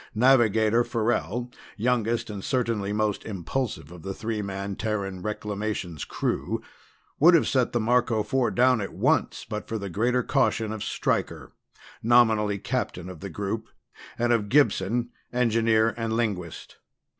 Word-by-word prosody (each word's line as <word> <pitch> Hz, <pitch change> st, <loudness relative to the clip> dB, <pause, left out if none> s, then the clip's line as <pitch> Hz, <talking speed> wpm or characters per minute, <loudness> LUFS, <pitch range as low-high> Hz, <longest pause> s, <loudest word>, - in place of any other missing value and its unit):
Navigator 115 Hz, -2 st, +4 dB
Farrell, 120 Hz, +1 st, -1 dB, 0.3 s
youngest 115 Hz, 0 st, 0 dB
and 100 Hz, -2 st, -6 dB
certainly 115 Hz, -6 st, -1 dB
most 105 Hz, -1 st, 0 dB
impulsive 100 Hz, -, -4 dB
of 90 Hz, -1 st, -11 dB
the 95 Hz, +3 st, -5 dB
three 110 Hz, -1 st, -3 dB
man 100 Hz, 0 st, -4 dB
Terran 100 Hz, -4 st, -3 dB
Reclamations 105 Hz, -5 st, -4 dB
crew, -, -, -2 dB, 0.6 s
would 170 Hz, +4 st, +7 dB
have 165 Hz, -, +3 dB
set 130 Hz, -3 st, +1 dB
the 120 Hz, -, 0 dB
Marco 115 Hz, -1 st, +2 dB
Four 125 Hz, +3 st, +1 dB
down 125 Hz, -2 st, +3 dB
at 100 Hz, -, -6 dB
once -, -, +1 dB
but 105 Hz, -1 st, -5 dB
for 110 Hz, -, -3 dB
the 100 Hz, -3 st, -5 dB
greater 120 Hz, +6 st, +1 dB
caution 115 Hz, -5 st, +1 dB
of 110 Hz, -, -5 dB
Stryker, -, -, -2 dB, 0.5 s
nominally 110 Hz, -3 st, +4 dB
captain 100 Hz, -6 st, -3 dB
of 90 Hz, -4 st, -9 dB
the 100 Hz, -, -6 dB
group, 105 Hz, +5 st, -4 dB, 0.5 s
and 120 Hz, 0 st, +2 dB
of 105 Hz, -3 st, 0 dB
Gibson, 120 Hz, -3 st, +2 dB, 0.2 s
engineer, 115 Hz, -2 st, +2 dB
and 115 Hz, -1 st, -2 dB
linguist. 100 Hz, -8 st, -3 dB
110 Hz, 145 wpm, -26 LUFS, 100-120 Hz, 0.6 s, would